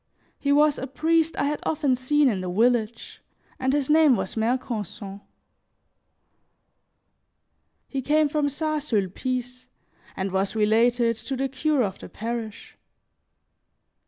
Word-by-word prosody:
He 280 Hz, -, 0 dB
was 295 Hz, 0 st, +4 dB
a 265 Hz, -, -4 dB
priest 325 Hz, +4 st, +1 dB
I -, -, +1 dB
had 290 Hz, +1 st, -1 dB
often 285 Hz, -4 st, 0 dB
seen 285 Hz, +3 st, +2 dB
in 200 Hz, -7 st, 0 dB
the 185 Hz, -, -4 dB
village, 230 Hz, +3 st, 0 dB, 0.4 s
and 260 Hz, -1 st, +1 dB
his 285 Hz, -1 st, 0 dB
name 305 Hz, -3 st, +5 dB
was -, -, -3 dB
Mercanson; 220 Hz, -4 st, -3 dB, 2.7 s
he 270 Hz, -, -3 dB
came 300 Hz, +3 st, +2 dB
from 290 Hz, 0 st, 0 dB
St. 310 Hz, +1 st, -2 dB
Sulpice 250 Hz, +2 st, -3 dB, 0.5 s
and 190 Hz, 0 st, -2 dB
was 195 Hz, +2 st, -1 dB
related 230 Hz, +2 st, +2 dB
to 265 Hz, +4 st, -4 dB
the 270 Hz, +1 st, 0 dB
cure 270 Hz, +1 st, 0 dB
of 195 Hz, -3 st, -4 dB
the -, -, -10 dB
parish. 225 Hz, -1 st, -6 dB
255 Hz, 130 wpm, -25 LUFS, 220-290 Hz, 2.7 s, name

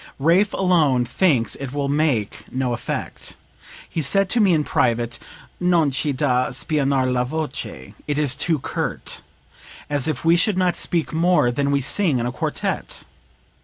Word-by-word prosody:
Raaff 175 Hz, +8 st, +3 dB
alone 155 Hz, -10 st, +3 dB
thinks 130 Hz, -2 st, +2 dB
it 135 Hz, -1 st, -6 dB
will 145 Hz, -1 st, -1 dB
make 140 Hz, -8 st, 0 dB
no 130 Hz, -1 st, -1 dB
effect. 120 Hz, -, -4 dB, 0.5 s
He 165 Hz, -, -3 dB
said 195 Hz, +6 st, +2 dB
to 245 Hz, -, +2 dB
me 200 Hz, -4 st, +5 dB
in 155 Hz, -3 st, +3 dB
private: 120 Hz, -3 st, 0 dB, 0.4 s
'Non 175 Hz, -5 st, +3 dB
c'e 140 Hz, +3 st, 0 dB
da 130 Hz, -2 st, +1 dB
spianar 135 Hz, 0 st, +1 dB
la 125 Hz, -1 st, +1 dB
voce 140 Hz, -, -5 dB
it 145 Hz, -1 st, -1 dB
is 145 Hz, -4 st, +2 dB
too 160 Hz, +3 st, 0 dB
curt.' -, -, -4 dB, 0.7 s
As 145 Hz, -1 st, 0 dB
if 155 Hz, -1 st, -3 dB
we 165 Hz, +1 st, +6 dB
should 185 Hz, +3 st, +2 dB
not 180 Hz, -1 st, +2 dB
speak 170 Hz, -1 st, -1 dB
more 165 Hz, -6 st, +3 dB
than 140 Hz, +3 st, 0 dB
we 140 Hz, 0 st, +2 dB
sing 155 Hz, +1 st, +1 dB
in 120 Hz, -, -1 dB
a 125 Hz, -, -1 dB
quartet! 125 Hz, -, -3 dB
145 Hz, 165 wpm, -22 LUFS, 130-170 Hz, 0.7 s, we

